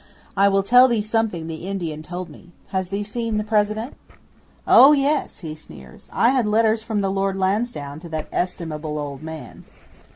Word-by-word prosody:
I 200 +1 +4
will 195 0 +2
tell 250 +5 +6
thee 235 -3 +1
something 215 -6 -1
the 160 +2 -7
Indian 170 -6 -4
told 180 +2 -6
me. 160 +2 -15 0.2
Has 190 -2 -2
thee 200 +1 -2
seen 225 +1 -3
the 210 - 0
President?" 215 +2 0 0.7
'"Oh 280 +3 +8
yes!" 285 -3 0
he 160 -3 -6
sneers. 65 - -14
"I 235 - +3
had 255 -4 +1
letters 220 +1 +2
from 220 -2 -2
the 195 -1 0
Lord 195 0 -1
Lansdowne 190 -7 -2
to 170 +1 -11
that 155 -1 -4
estimable 160 -4 -3
old 145 -2 -5
man." 160 -1 -9
195 Hz, 175 wpm, -22 LUFS, 160-220 Hz, 0.7 s, Oh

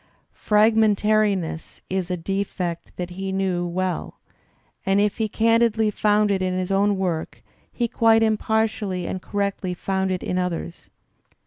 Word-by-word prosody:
Fragmentariness 210 -5 +2
is 185 -1 -2
a 180 - -1
defect 180 -1 -3
that 180 0 -5
he 190 +2 -4
knew 185 -2 -1
well, 185 +1 -3 0.6
and 195 +1 +2
if 205 0 +1
he 220 -1 0
candidly 225 0 +2
found 210 0 +2
it 195 -1 0
in 185 0 -1
his 185 +1 -2
own 200 +1 +2
work 175 -4 -3 0.3
he 240 - -1
quite 225 0 +4
impartially 215 -4 0
and 185 - -4
correctly 200 -2 -2
found 190 +1 -1
it 185 -1 -2
in 180 - -1
others. 175 -1 -4
195 Hz, 140 wpm, -23 LUFS, 180-215 Hz, 0.6 s, quite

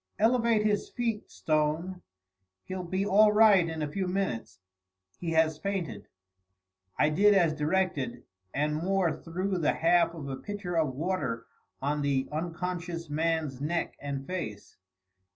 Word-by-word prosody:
"Elevate 230 -1 +3
his 205 -1 +1
feet, 230 -3 -2
Stone. 155 +4 -1 0.6
He'll 185 0 -5
be 185 +3 -1
all 210 +1 +6
right 210 -5 +6
in 160 -1 -3
a - - -1
few 190 +2 -2
minutes; 150 - -2 0.6
he 170 - -3
has 160 -1 +3
fainted." 180 - -3 0.9
I 150 - +4
did 205 +7 +5
as 170 -5 +4
directed, 150 -4 -1 0.3
and 150 +1 0
Moore 180 0 +1
threw 185 +3 -3
the 155 - +2
half 170 0 +3
of 150 -4 -7
a 135 -1 -4
pitcher 200 +1 -5
of 155 -6 +1
water 140 -8 -2 0.4
on 145 +1 0
the 140 -2 +1
unconscious 170 0 -4
man's 155 -3 -1
neck 165 +4 -1
and 140 -1 -4
face. 150 - -5
170 Hz, 140 wpm, -29 LUFS, 150-190 Hz, 0.9 s, all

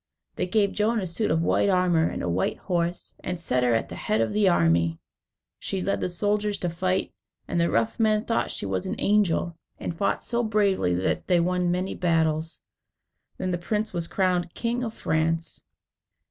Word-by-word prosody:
They - - -1
gave 200 +1 +2
Joan 220 +2 +1
a 190 - -2
suit 185 +5 -1
of 160 +1 +2
white 200 - +2
armour, 180 -4 +3
and - - -4
a - - -1
white 85 +2 0
horse, 175 -1 -2
and 180 -1 -3
set 125 -7 +1
her 120 -2 +3
at 115 - 0
the - - -9
head 110 - -1
of 115 - 0
the 205 -2 +4
army. 85 - +2 0.6
She 195 - -3
led 195 +2 -1
the - - 0
soldiers 205 +3 0
to 175 - -2
fight, 185 +2 -1 0.3
and 170 - 0
the 170 - +2
rough 225 - 0
men 215 -1 +2
thought 230 - 0
she - - -4
was 95 -2 -2
an - - -2
angel, 195 -5 +2 0.2
and 170 - -4
fought 200 - 0
so 235 0 0
bravely 200 - +2
that 90 - -1
they 180 -2 +4
won 180 +1 +1
many 180 +2 -1
battles. 160 -2 0 0.7
Then 185 -1 -2
the 175 - -1
prince 210 +4 -2
was 170 -2 -2
crowned 180 -3 0
King 240 +1 -1
of 225 -2 -4
France. 165 +1 -1
180 Hz, 195 wpm, -26 LUFS, 165-205 Hz, 0.7 s, the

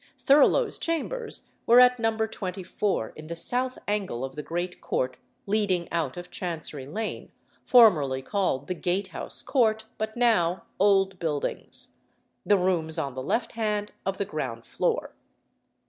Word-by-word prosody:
Thurloe's 295 - +4
chambers 435 +9 -3 0.2
were 240 +2 +8
at 250 0 +6
No. 225 -1 +1
24 195 - -2
in 155 0 -10
the 170 - -5
south 250 +9 0
angle 195 - -1
of 135 - -9
the 150 - -4
great 175 +3 -4
court 130 0 -1 0.3
leading 195 -4 +1
out 165 -5 -1
of 175 - -8
Chancery 160 -6 -4
Lane, 215 +9 -5 0.3
formerly 150 - +5
called 185 -7 -1
the 180 - -2
Gatehouse 185 +2 -2
Court, 220 -4 +2
but 220 +1 -3
now 185 -8 +2 0.2
Old 195 -1 +3
Buildings 150 -4 -4 0.5
the 205 - +4
rooms 175 -4 0
on 140 -2 -2
the 130 - -5
left 230 - -1
hand 210 -2 -2
of 195 0 -2
the 200 - -1
ground 120 -9 -5
floor. - - -1
190 Hz, 145 wpm, -27 LUFS, 160-220 Hz, 0.5 s, were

